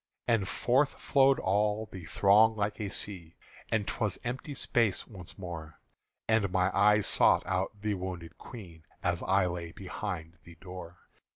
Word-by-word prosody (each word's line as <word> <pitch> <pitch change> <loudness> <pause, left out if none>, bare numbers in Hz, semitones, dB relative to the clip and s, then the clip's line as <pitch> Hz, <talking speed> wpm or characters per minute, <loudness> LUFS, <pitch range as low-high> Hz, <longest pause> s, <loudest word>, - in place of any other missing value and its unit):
And 115 -5 +2
forth 135 +8 +2
flowed 135 -1 +4
all 105 +3 +1
the 90 -3 -8
throng 105 +6 +5
like 105 0 -2
a 100 - -2
sea, 90 -5 -4 0.3
And 110 -2 +1
't - - -4
was 105 -4 +1
empty 130 +4 -4
space 115 -6 +1
once 95 -6 -9
more; 80 -5 -8 0.5
And 110 -4 +2
my 95 0 +1
eyes 105 +1 +5
sought - - +4
out 95 +3 -2
the 105 0 -1
wounded 90 -3 -6
Queen 90 -10 -11 0.2
As - - 0
I - - +3
lay 85 -1 -4
behind 90 -4 -6
the 85 - -14
door. 90 -1 -10
100 Hz, 160 wpm, -30 LUFS, 90-110 Hz, 0.5 s, throng